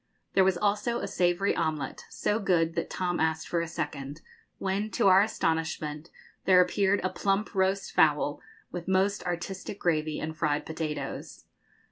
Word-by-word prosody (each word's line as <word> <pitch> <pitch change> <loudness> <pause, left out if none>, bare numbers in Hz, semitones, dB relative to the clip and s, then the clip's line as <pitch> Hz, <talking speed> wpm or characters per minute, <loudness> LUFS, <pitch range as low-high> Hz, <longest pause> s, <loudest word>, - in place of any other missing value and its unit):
There 190 - +5
was 185 -1 +2
also 210 +5 0
a - - -3
savoury 175 +2 +1
omelette, 155 -4 -2
so 210 - 0
good 170 -5 +2
that - - -2
Tom 180 -1 -1
asked 160 0 0
for 170 - 0
a 170 - -3
second; 145 -2 -5 0.4
when, 195 +2 -1
to 200 - +2
our 190 +1 +7
astonishment, 160 -5 -1 0.4
there 185 -1 +6
appeared 195 +2 +3
a 185 - +1
plump 200 +3 0
roast 195 0 +1
fowl, 150 -1 +3 0.3
with 175 -1 -6
most 190 +2 +2
artistic 180 +3 -4
gravy 155 -3 0
and 160 +1 -4
fried 150 -2 0
potatoes. 160 -1 -5
175 Hz, 155 wpm, -28 LUFS, 160-195 Hz, 0.4 s, our